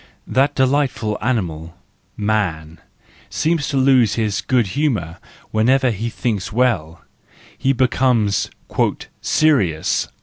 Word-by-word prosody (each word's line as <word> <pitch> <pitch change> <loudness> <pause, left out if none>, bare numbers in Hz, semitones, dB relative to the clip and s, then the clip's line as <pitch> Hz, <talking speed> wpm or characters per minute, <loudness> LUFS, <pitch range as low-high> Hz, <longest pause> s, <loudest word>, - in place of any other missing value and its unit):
That 135 +2 +1
delightful 130 -5 +1
animal, 85 -9 -2 0.4
man, 90 -7 -2 0.5
seems 160 -2 0
to 140 - -1
lose 130 -5 +4
his 105 -3 -1
good 120 -6 +1
humour 105 - -1 0.3
whenever 125 +4 +3
he 115 +2 -3
thinks 110 -4 -3
well; 100 -9 0 0.6
he 135 - +2
becomes 120 -6 +1 0.4
" - - -7
serious 105 - +1
115 Hz, 105 wpm, -19 LUFS, 95-130 Hz, 0.6 s, lose